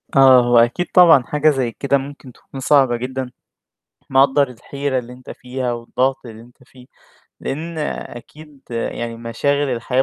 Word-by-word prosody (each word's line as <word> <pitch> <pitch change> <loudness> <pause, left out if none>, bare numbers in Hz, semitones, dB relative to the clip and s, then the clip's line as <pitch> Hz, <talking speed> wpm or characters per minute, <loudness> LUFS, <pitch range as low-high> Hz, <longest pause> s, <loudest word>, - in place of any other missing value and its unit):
آه، 130 -2 +7
هو 120 0 +3
أكيد 120 +10 +2
طبعًا 165 -8 +6
حاجة 150 +4 +1
زي 130 -5 -1
كده 140 +3 0
ممكن 135 -1 -9
تكون 135 - -12
صعبة 130 -3 +3
جدًا، 130 +1 -5 0.8
مقدّر 135 +1 +3
الحيرة 130 +2 -4
اللي 125 +1 -10
أنت 125 0 -15
فيها 125 0 -5
والضغط 130 +3 -2
اللي 110 -1 -11
أنت 120 +2 -20
فيه، 125 -1 -18 0.6
لإن 160 +3 -5
أكيد 150 +1 -8
يعني 115 0 -4
مشاغل 140 +5 -1
الحياة 125 +2 0
130 Hz, 150 wpm, -19 LUFS, 120-140 Hz, 0.8 s, آه